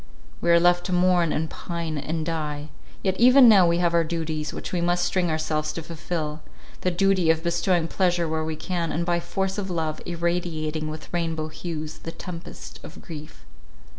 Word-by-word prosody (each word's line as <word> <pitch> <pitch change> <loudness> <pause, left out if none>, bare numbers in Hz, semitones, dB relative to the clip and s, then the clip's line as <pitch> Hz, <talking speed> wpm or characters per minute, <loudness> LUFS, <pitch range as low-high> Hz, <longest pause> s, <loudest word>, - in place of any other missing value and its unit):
We 170 - 0
are 170 0 +7
left 175 0 +3
to 185 - -2
mourn, 180 -2 +3
and 160 +1 0
pine, 170 -1 -4
and 155 +2 -3
die. 150 -2 -3 0.3
Yet 190 -1 0
even 250 +2 +8
now 195 -6 +7
we 170 0 +2
have 175 -1 +2
our 170 0 +4
duties, 155 -2 -3
which - - -6
we 180 - 0
must 175 +1 +2
string 175 0 +1
ourselves 155 -1 -1
to 165 - -5
fulfil: 155 -1 -4 0.4
the 185 - +1
duty 185 -1 +2
of 160 0 +3
bestowing 170 0 +1
pleasure 175 -2 +1
where 160 0 -1
we 160 0 -3
can, 170 0 -2
and 170 +2 -1
by 175 0 +1
force 190 +3 -2
of 195 -1 -4
love, 160 -3 -2
irradiating 165 -3 -2
with 155 +2 -8
rainbow 165 -2 -1
hues 155 -1 -6
the 165 - -6
tempest 170 -1 -9
of 155 - -11
grief. 155 -2 -10
170 Hz, 190 wpm, -25 LUFS, 155-175 Hz, 0.4 s, even